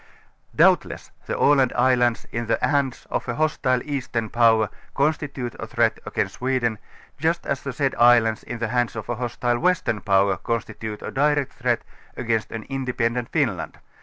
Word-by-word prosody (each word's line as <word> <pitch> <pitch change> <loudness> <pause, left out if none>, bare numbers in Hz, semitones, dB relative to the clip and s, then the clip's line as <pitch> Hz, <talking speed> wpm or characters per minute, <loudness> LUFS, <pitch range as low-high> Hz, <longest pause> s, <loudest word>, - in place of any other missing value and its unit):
Doubtless - - +3 0.2
the - - -2
x\land 135 -3 +4
islands 125 -2 +2
in 115 0 -3
the 115 - +2
hands 140 -3 0
of - - -2
a 120 - -1
hostile 130 -4 +1
eastern 125 -6 -3
power 115 -3 +4 0.3
constitute 140 -4 -1
a - - -5
threat - - +1
against - - -2
Sweden, 125 -4 0 0.4
just 165 +3 0
as 140 - -2
the 140 - -4
said 135 +1 0
islands 120 -2 +5
in 120 - -6
the 115 -1 -2
hands 120 -1 0
of 110 - -6
a 120 - 0
hostile 120 0 -1
western 175 - +1
power 95 -2 +2
o(jnstitute 110 -2 -4
a - - -5
direct 145 0 +1
threat - - -1 0.3
against 115 -2 -1
an 115 -1 -5
independent 125 -2 -2
Finland. - - -1
120 Hz, 165 wpm, -23 LUFS, 115-135 Hz, 0.4 s, islands